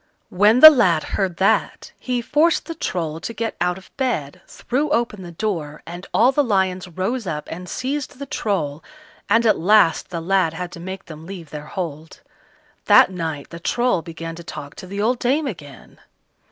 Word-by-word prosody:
When 210 Hz, +6 st, +4 dB
the 310 Hz, -, +13 dB
lad 185 Hz, -, +3 dB
heard 185 Hz, -4 st, -2 dB
that, 190 Hz, -, +1 dB
he 250 Hz, -2 st, -2 dB
forced 310 Hz, +6 st, +2 dB
the 330 Hz, -, -5 dB
Troll 165 Hz, -, -3 dB
to 230 Hz, +7 st, -6 dB
get 230 Hz, -1 st, -3 dB
out 180 Hz, 0 st, +1 dB
of 190 Hz, -, -16 dB
bed, 240 Hz, -, -2 dB
threw 285 Hz, +5 st, -2 dB
open 235 Hz, -8 st, 0 dB
the 175 Hz, -2 st, -9 dB
door, 165 Hz, -6 st, -4 dB
and 175 Hz, +2 st, -9 dB
all 245 Hz, +4 st, +4 dB
the 290 Hz, +2 st, +2 dB
lions 190 Hz, -5 st, 0 dB
rose 190 Hz, +6 st, -3 dB
up 150 Hz, -3 st, -4 dB
and 180 Hz, +1 st, -7 dB
seized 270 Hz, +2 st, -4 dB
the 280 Hz, -, -6 dB
Troll, 165 Hz, -, -2 dB, 0.5 s
and 230 Hz, +3 st, +4 dB
at 220 Hz, -, +3 dB
last 190 Hz, -2 st, +4 dB
the 170 Hz, -, -4 dB
lad 170 Hz, -1 st, +1 dB
had 180 Hz, +1 st, -5 dB
to -, -, -10 dB
make 190 Hz, +2 st, -7 dB
them 155 Hz, 0 st, -11 dB
leave 175 Hz, -5 st, -9 dB
their 150 Hz, 0 st, -7 dB
hold. 165 Hz, -, -6 dB, 0.6 s
That -, -, +6 dB
night 160 Hz, -5 st, -5 dB
the 170 Hz, -, -8 dB
Troll 240 Hz, +1 st, +1 dB
began 165 Hz, 0 st, -7 dB
to 170 Hz, -, -9 dB
talk 145 Hz, -3 st, -8 dB
to 185 Hz, -, -9 dB
the 200 Hz, +2 st, -6 dB
old 240 Hz, +4 st, +1 dB
dame 280 Hz, +5 st, +1 dB
again. 150 Hz, -, -9 dB
185 Hz, 190 wpm, -21 LUFS, 165-235 Hz, 0.6 s, the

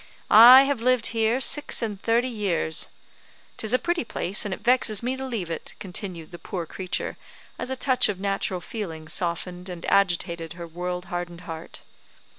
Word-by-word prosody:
I 245 Hz, +5 st, +10 dB
have 275 Hz, -4 st, -1 dB
lived 250 Hz, -1 st, +3 dB
here 225 Hz, +2 st, +2 dB
six 290 Hz, -1 st, +2 dB
and 205 Hz, -3 st, -4 dB
thirty 235 Hz, +2 st, +2 dB
years; 195 Hz, -9 st, 0 dB, 0.7 s
'tis 220 Hz, -, -2 dB
a 255 Hz, -, +5 dB
pretty 345 Hz, +4 st, -1 dB
place 205 Hz, -3 st, -2 dB
and 205 Hz, -, -3 dB
it 190 Hz, -, -5 dB
vexes 235 Hz, -4 st, +2 dB
me 255 Hz, +2 st, -1 dB
to 265 Hz, -, -6 dB
leave 225 Hz, -10 st, -4 dB
it," 165 Hz, -, -6 dB
continued 180 Hz, -4 st, -6 dB
the 175 Hz, -, -9 dB
poor 175 Hz, -4 st, -5 dB
creature, 185 Hz, +3 st, -4 dB, 0.4 s
as -, -, -4 dB
a 265 Hz, -, -2 dB
touch 260 Hz, -2 st, +2 dB
of 195 Hz, -3 st, -3 dB
natural 195 Hz, -2 st, -2 dB
feeling 165 Hz, -9 st, -6 dB
softened 180 Hz, +2 st, -4 dB
and 175 Hz, -2 st, -7 dB
agitated 170 Hz, -4 st, +1 dB
her 170 Hz, 0 st, -8 dB
world 180 Hz, +2 st, -5 dB
hardened 175 Hz, -1 st, -4 dB
heart. 165 Hz, -1 st, -9 dB
195 Hz, 175 wpm, -25 LUFS, 175-235 Hz, 0.7 s, I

